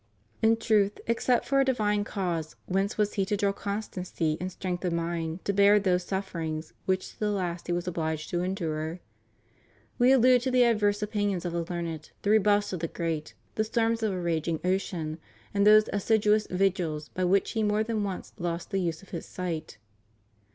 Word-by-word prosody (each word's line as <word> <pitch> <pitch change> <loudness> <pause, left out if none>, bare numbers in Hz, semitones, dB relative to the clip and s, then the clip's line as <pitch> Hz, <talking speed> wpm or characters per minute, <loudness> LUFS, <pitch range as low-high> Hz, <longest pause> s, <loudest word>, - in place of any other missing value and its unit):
In 225 0 +4
truth, 210 -3 +2
except 235 +1 +1
for 275 0 +2
a - - +6
divine 210 -6 +1
cause, 175 -6 -3
whence 195 +2 -1
was 210 -1 +1
he 195 -2 0
to 205 +1 -1
draw 200 0 +2
constancy 190 -6 -3
and 185 +1 -3
strength 180 0 -4
of 180 -2 0
mind 170 0 -3
to 200 - +1
bear 200 +1 +6
those 180 -2 +1
suf 190 +1 -3
ferings 160 -2 -4
which 185 0 0
to - - -23
the 210 - +1
last 180 -4 -2
he 175 - 0
was 175 +1 -2
obliged 160 -3 -2
to 175 - 0
endure? 165 -3 -2 1.0
We 245 +2 +6
allude 255 -1 +6
to 260 - -1
the 250 -1 +5
adverse 210 -3 +2
opinions 205 -4 -1
of 175 - -2
the 170 -1 -1
learned, 165 -3 -4
the 205 - +2
rebuffs 205 -1 +3
of 180 - -2
the 165 - -2
great, 160 -2 -3 0.2
the 215 - +1
storms 225 +1 0
of 220 -2 +1
a 185 - -3
raging 165 -2 -1
ocean, 180 -4 -1 0.3
and 200 0 +3
those 215 0 +7
as 205 -1 -2
siduous 215 -1 +3
vigils 180 -5 0
by 185 - -3
which 190 +2 +2
he 225 - -1
more 210 0 +2
than 220 -2 -1
once 195 -2 -5
lost 170 0 -3
the 195 - +1
use 165 -1 -2
of 195 - -16
his 170 - -6
sight. 165 -7 -5
190 Hz, 200 wpm, -28 LUFS, 170-210 Hz, 1.0 s, those